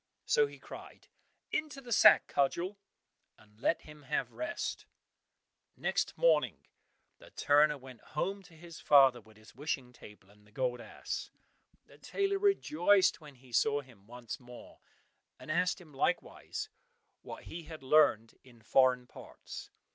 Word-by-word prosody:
So 460 -2 +3
he - - -12
cried, - - -12 0.4
"Into 305 -3 -2
the 250 -3 -11
sack, - - +7
Cudgel!" 175 +8 -1 0.6
and 105 0 -23
let 165 - +1
him 150 0 -13
have 135 - -2
rest. 335 +2 -4 0.9
Next - - -1
morning - - +2 0.5
the - - -15
turner 150 +1 +3
went 130 -2 -13 0.2
home 195 +5 -1
to 165 - -17
his 170 +1 -12
father 135 -4 +6
with 110 0 -20
the 110 0 -17
wishing 130 -3 -4
table, 105 -4 -15
and 105 0 -23
the - - -22
gold 125 +1 -2
ass. - - -6 0.6
The - - -19
tailor 395 0 -1
rejoiced 205 - +3
when 150 -2 -13
he 125 0 -19
saw 145 +4 +2
him 115 -7 -20
once 120 +2 -8
more, 125 -1 -13 0.6
and - - -7
asked 180 +4 +1
him 160 -5 -16
likewise 260 - -2 0.5
what - - -9
he 170 -1 -8
had 155 -3 -10
learned 130 -6 +3
in 120 -3 -19
foreign 125 +1 +3
parts. - - -11
145 Hz, 145 wpm, -32 LUFS, 125-180 Hz, 0.9 s, sack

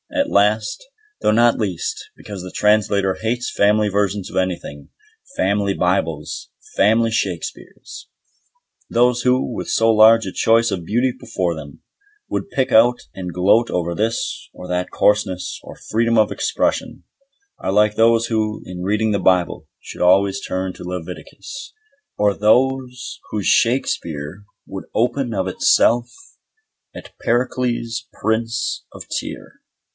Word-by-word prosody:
And - - 0
last, 105 - +1 0.4
though - - +3
not 120 +2 +4
least, 95 -6 -3
because 100 -3 -8
the 90 0 -8
Translator 100 -2 +2
hates 120 +2 -2
family 105 +1 +3
versions 100 -1 -1
of - - -10
anything, 90 -6 -3 0.5
"Family 100 0 +1
Bibles", 85 -4 -1 0.3
"Family 115 +3 +3
Shakespeares". 110 - -5 0.8
Those 125 +1 +2
who, 125 0 +1
with - - -5
so 115 0 +3
large 110 0 +6
a 95 - -5
choice 115 +1 +3
of 90 -4 -3
beauty 120 +6 +1
before 85 -2 -2
them, 75 -3 -10 0.5
would - - -3
pick 130 -7 -1
out 120 +2 +5
and 90 -2 -6
gloat 95 +7 +3
over 85 -1 -1
this 110 +4 -2
or 90 - -10
that 90 0 -2
coarseness 105 -3 +1
or - - -10
freedom 115 +1 0
of 110 -1 +3
expression, - - -1 0.6
are - - -2
like 105 +1 +3
those 115 0 +4
who, 110 -2 -2
in 90 -1 -7
reading 105 +4 0
the 100 - +1
Bible, 90 -2 +1
should - - -10
always 95 +2 +3
turn 95 0 -3
to - - -11
Leviticus, 90 - -8 0.4
or 105 -1 +3
those 125 +3 +1
whose 105 -3 -3
Shakespeare 90 - 0 0.2
would 95 - -8
open 120 +1 0
of 95 -2 -1
itself 120 +5 +3 0.8
at - - -11
Pericles 120 -1 -1
Prince 115 +1 -1
of - - -10
Tyre. - - -9
105 Hz, 135 wpm, -20 LUFS, 95-115 Hz, 0.8 s, large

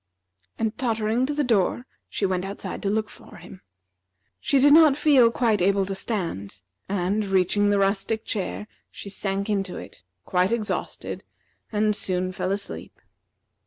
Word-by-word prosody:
And 220 -1 -1
tottering 230 0 0
to 295 - -2
the 295 - +1
door, 235 0 +1 0.2
she 200 - -1
went 185 -1 0
outside 195 +1 -6
to 200 - -1
look 215 +1 0
for - - -15
him. 180 +1 -12 0.8
She 280 - +1
did 285 +2 +6
not 310 -3 +7
feel 265 -7 +5
able 200 -5 +3
to 195 - -4
stand, 170 - -4 0.3
and 200 +2 0
reaching 195 +1 +2
the 205 - +3
rustic 200 +3 0
chair, 210 0 -3 0.2
she 200 - -9
sank 195 0 -2
into 195 -3 -1
it, - - -11 0.2
quite 180 +2 +1
exhausted, 225 -2 -3 0.5
and 210 -1 +1
soon 185 -2 -1
fell 185 0 -2
asleep. 200 0 -6
205 Hz, 150 wpm, -25 LUFS, 190-225 Hz, 0.8 s, not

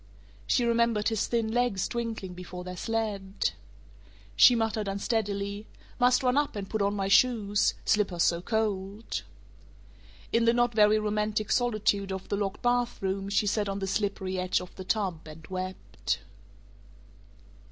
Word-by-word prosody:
She 240 - +2
remembered 235 -2 +2
his 220 -1 -1
thin 230 -2 0
legs 240 -5 +1
twinkling 225 -6 -4
before 180 0 -8
their 180 0 -6
sled 210 -2 -2 0.8
She 245 - +8
muttered 220 -2 -1
unsteadily, 200 0 -2 0.3
"Must 250 +1 +4
run 250 +1 +2
up 290 -4 +1
and 200 -2 -4
put 220 +1 -2
on 200 +1 +1
my 195 -1 -1
shoes 205 -2 +3
slippers 195 -5 +2
so 170 0 +2
cold." 210 0 -2 1.1
In 230 0 +3
the 230 - +5
not 240 0 +2
very 215 0 +5
romantic 210 0 -1
solitude 215 -5 +1
of 190 0 -5
the - - 0
locked 200 -1 -3
bathroom 235 -6 0
she 200 +1 +2
sat 205 0 0
on 195 - -2
the 195 - -2
slippery 195 -1 -2
edge 185 0 +1
of 180 -1 -10
the 185 - -7
tub 185 -6 -2
and 155 +1 -11
wept. 185 0 -4
205 Hz, 150 wpm, -28 LUFS, 195-225 Hz, 1.1 s, She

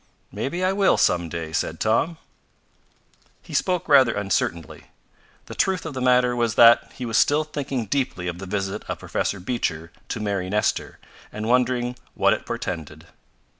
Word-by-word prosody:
"Maybe 175 +7 -3
I 185 +1 +2
will, 195 -1 +3
some 85 -1 +2
day," 80 -1 -5
said 80 0 -2
Tom. 130 +10 +1 1.3
He - - -12
spoke 180 -2 0
rather 135 -5 +5
uncertainly. 95 -5 -2 0.6
The - - -9
truth 190 -2 0
of 160 - -5
the 130 - -4
matter 125 -1 +3
was 120 -2 0
that 115 0 +6
he 125 - -5
was 115 -1 +2
still 150 +2 +3
thinking 140 -5 -4
deeply 105 -6 -2
of 85 0 -4
the 95 - -7
visit 95 0 -3
of - - -2
Professor 100 - -2
Beecher 90 -6 -3 0.2
to - - -3
Mary 100 -3 -2
Nestor, 105 +1 -1 0.3
and 105 +1 -5
wondering 125 0 +1 0.2
what - - +3
it - - -5
portended. 80 -5 -5
115 Hz, 165 wpm, -23 LUFS, 95-135 Hz, 1.3 s, that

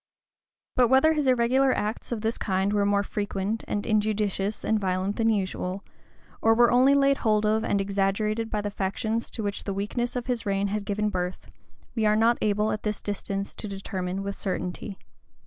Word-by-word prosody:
But 250 -1 +5
whether 265 +6 +5
his 300 -3 0
irregular 255 +2 +3
acts 215 +4 -3
of 230 -3 -2
this 225 +1 -1
kind 190 0 0
were 205 -1 +2
more 200 0 +2
frequent, 205 +1 -3
and 205 - -2
injudicious 210 -2 0
and 220 -1 +2
violent 190 +1 -1
than 225 0 +2
usual, 190 -2 -2 0.6
or 225 0 +4
were 240 0 +5
only 260 +3 +5
laid 275 0 +4
hold 215 -2 +2
of 220 +1 +2
and 200 - +1
exaggerated 200 +3 0
by 210 - -1
the 205 0 -3
factions 220 +4 -2
to 225 - -5
which 200 -1 -3
the 195 - -3
weakness 240 +5 -2
of 245 -1 -2
his 245 -2 -1
reign 200 -1 0
had 205 0 -2
given 210 +1 0
birth, 180 -1 -4 0.4
we 220 -3 +1
are 210 - +4
not 230 +2 +3
able 210 +1 +1
at 215 - -3
this 210 -1 -2
distance 200 -1 -4
to 215 - -7
determine 195 -1 -4
with 200 0 -4
certainty. 190 +1 -4
210 Hz, 190 wpm, -26 LUFS, 195-225 Hz, 0.6 s, But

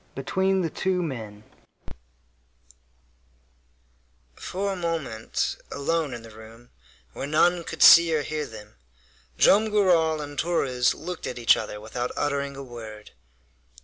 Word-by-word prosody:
BETWEEN 190 +7 0
THE 165 - -2
TWO 185 -1 -1
MEN 110 -9 -7 2.9
For 195 +2 -3
a - - -5
moment, 160 -11 -3
alone 145 -1 -1
in 115 - -10
the 115 - -12
room, 110 +2 -15 0.4
where 140 - -5
none 170 +3 +2
could - - -1
see 170 -1 +9
or 150 - 0
hear 155 0 -4
them, 105 -1 -13 0.6
Joam 215 +2 +5
Garral 175 -7 +2
and 145 -1 -6
Torres 130 -7 +1
looked 175 +2 -6
at 125 - -5
each 120 -1 +5
other 105 -1 -6
without 120 +3 -4
uttering 140 -1 -2
a 140 - -7
word. 110 -4 -10
145 Hz, 130 wpm, -25 LUFS, 120-170 Hz, 2.9 s, see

